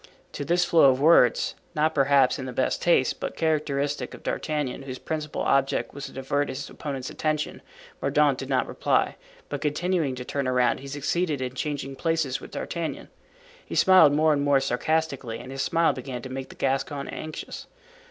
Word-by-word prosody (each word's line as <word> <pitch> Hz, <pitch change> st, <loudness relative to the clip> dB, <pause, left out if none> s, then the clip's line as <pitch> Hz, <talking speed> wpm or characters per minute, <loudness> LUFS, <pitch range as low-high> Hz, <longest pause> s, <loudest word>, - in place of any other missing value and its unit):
To 145 Hz, -, -5 dB
this 175 Hz, +4 st, +2 dB
flow 165 Hz, -3 st, +5 dB
of 130 Hz, 0 st, +2 dB
words, 145 Hz, -5 st, +5 dB, 0.2 s
not 155 Hz, +1 st, +2 dB
perhaps 140 Hz, -1 st, +3 dB
in 130 Hz, -, -5 dB
the -, -, -4 dB
best 130 Hz, -, 0 dB
taste, 170 Hz, -7 st, +2 dB
but -, -, -4 dB
characteristic 145 Hz, -3 st, -1 dB
of -, -, -15 dB
D'Artagnan, 150 Hz, -5 st, -2 dB
whose 130 Hz, -2 st, -6 dB
principal 155 Hz, +1 st, -4 dB
object 135 Hz, 0 st, +1 dB
was 140 Hz, 0 st, -6 dB
to -, -, -11 dB
divert 140 Hz, +2 st, -1 dB
his 130 Hz, +2 st, -5 dB
opponent's 135 Hz, -4 st, -5 dB
attention, 155 Hz, -1 st, -2 dB, 0.4 s
Mordaunt -, -, +2 dB
did -, -, -6 dB
not -, -, +2 dB
reply, -, -, +1 dB, 0.3 s
but -, -, -5 dB
continuing 155 Hz, -1 st, 0 dB
to 125 Hz, 0 st, -7 dB
turn 140 Hz, 0 st, -2 dB
around 125 Hz, -2 st, +2 dB
he 140 Hz, -, -9 dB
succeeded 145 Hz, +2 st, -1 dB
in 130 Hz, -1 st, -3 dB
changing 140 Hz, 0 st, -4 dB
places 160 Hz, -4 st, -1 dB
with -, -, -10 dB
D'Artagnan. 170 Hz, -2 st, -4 dB, 0.5 s
He -, -, -7 dB
smiled 185 Hz, -6 st, +7 dB
more 155 Hz, +1 st, +4 dB
and 145 Hz, -, 0 dB
more 140 Hz, -1 st, +4 dB
sarcastically 135 Hz, -2 st, -1 dB
and 125 Hz, -, -9 dB
his 135 Hz, 0 st, -3 dB
smile 165 Hz, +4 st, +2 dB
began 125 Hz, -2 st, -6 dB
to 130 Hz, -, -7 dB
make 130 Hz, 0 st, -6 dB
the -, -, -12 dB
Gascon 140 Hz, +1 st, -1 dB
anxious. 155 Hz, 0 st, -7 dB
140 Hz, 180 wpm, -26 LUFS, 130-155 Hz, 0.5 s, smiled